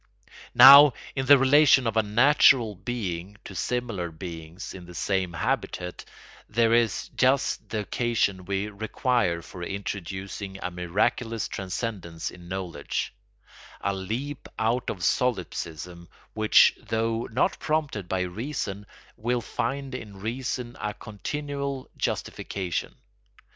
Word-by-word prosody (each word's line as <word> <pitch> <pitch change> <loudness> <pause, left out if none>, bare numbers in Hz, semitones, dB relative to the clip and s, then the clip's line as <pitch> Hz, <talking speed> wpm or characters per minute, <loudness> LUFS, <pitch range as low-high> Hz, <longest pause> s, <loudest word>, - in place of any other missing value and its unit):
Now, 140 +3 +11 0.2
in 130 -1 -2
the 145 0 +9
relation 135 -1 +5
of 115 -1 -1
a 110 - +5
natural 120 +1 +5
being 100 -3 -5
to - - -8
similar 95 +1 -2
beings 80 0 -8
in 90 -2 -10
the 90 - -11
same 95 +1 0
habitat 90 +1 -3 0.4
there 115 +1 +3
is 115 -4 +1
just 130 +1 +1
the 110 - -2
occasion 105 -4 0
we 100 +2 -1
require 105 -4 0
for 90 - -10
introducing 100 +1 -5
a 90 - -2
miraculous 110 +6 -1
transcendence 95 -3 -4
in 90 -1 -13
knowledge, 90 -6 -4 0.7
a 100 - -1
leap 115 +10 -5
out 115 +3 0
of 90 -4 -5
solipsism 85 -5 -2 0.2
which, 110 -1 +6
though 115 +1 -1
not 125 - +1
prompted 150 - -2
by 95 -1 0
reason, 100 +1 -4 0.3
will 120 +2 0
find 135 +3 -3
in 105 -6 -8
reason 120 +2 -4
a 105 0 -3
continual 140 +4 -5
justification. 90 -4 -3
105 Hz, 120 wpm, -26 LUFS, 90-125 Hz, 0.7 s, Now